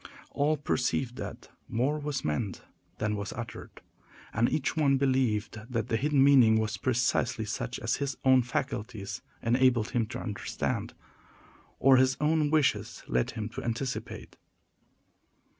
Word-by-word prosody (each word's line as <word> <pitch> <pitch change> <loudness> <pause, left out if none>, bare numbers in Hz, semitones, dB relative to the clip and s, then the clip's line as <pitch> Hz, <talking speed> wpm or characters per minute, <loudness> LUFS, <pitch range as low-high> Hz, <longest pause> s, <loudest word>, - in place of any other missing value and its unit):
All 150 +2 +1
perceived 130 -3 -1
that - - -7 0.2
more 135 +6 0
was 145 -2 -3
meant 90 +6 -2 0.3
than 105 0 -1
was 100 -1 -4
uttered, 115 0 -8 0.5
and 115 +2 +2
each 150 +1 0
one 140 -4 +3
believed 125 -5 +1
that 115 -1 -2
the 115 - +1
hidden 140 +3 +3
meaning 130 -6 +6
was 110 -1 -1
precisely 120 +3 0
such - - -3
as - - 0
his 140 -2 -3
own 130 -1 +6
faculties 110 -4 -4 0.2
enabled 120 -1 +3
him 115 -3 0
to - - -6
understand, 105 -4 -3 0.8
or 135 -1 +6
his 130 +1 +3
own 150 0 +2
wishes 150 -3 +1
led 60 - +1
him 105 -1 -2
to - - -7
anticipate. 125 +2 -4
125 Hz, 140 wpm, -29 LUFS, 110-135 Hz, 0.8 s, meaning